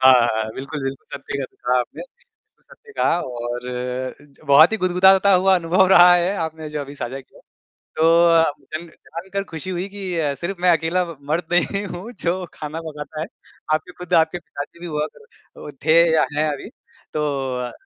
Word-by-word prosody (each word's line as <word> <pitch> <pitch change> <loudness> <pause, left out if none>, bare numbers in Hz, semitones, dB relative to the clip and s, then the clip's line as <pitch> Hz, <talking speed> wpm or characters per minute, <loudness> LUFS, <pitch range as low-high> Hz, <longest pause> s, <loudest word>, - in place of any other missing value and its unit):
हाँ, 130 0 +8
हाँ, 120 -3 +3
बिल्कुल, 140 +2 -6
बिल्कुल 135 0 -5
सत्य 140 0 -4
कहा 125 +1 +1
आपने, 125 - -4 0.3
बिल्कुल - - -44
सत्य 465 -2 -18
कहा। 170 - +2
और 120 0 -5
अ, 130 - +2
ज - - +1
गुदगुदाता 190 +2 +5
हुआ 190 +1 +4
बहुत - - -12
ही - - -8
अनुभव 185 +2 +4
रहा 180 -1 +8
है 175 +3 +1
आपने 160 -1 -4
जो 150 -1 -4
अभी 140 +1 -9
साझा 135 0 -5
किया। 130 - -18 0.6
तो 160 - +1 0.3
अ, 165 0 +6
आपसे 150 0 -2
ना 170 - -15
जानकर 190 +6 -6
खुशी 170 -1 -7
हुई 185 +1 -3
कि 195 -3 -5
अ, 145 -3 0
सिर्फ़ 175 +6 -5
मैं 180 - +4
अकेला 170 +3 0
ब 170 -3 -9
मर्द 170 +2 0
नहीं 200 +3 +1
हूँ 190 +4 -7
जो 180 +2 -1
खाना 155 +2 -6
पकाता 155 -1 -7
है। 160 - -3 0.5
आपकी 155 +3 -1
खुद 180 0 -7
आपके 165 +1 +3
पिताजी 145 0 -9
भी 175 - -8
हुआ 150 -2 -2
कर 455 - -16
अ, - - -7
थे 160 +1 +6
या 160 - +4
हैं 155 - +2
अभी। 140 - -8 0.4
तो 150 0 0 0.4
अ, 120 - -6
160 Hz, 200 wpm, -21 LUFS, 140-180 Hz, 0.6 s, हाँ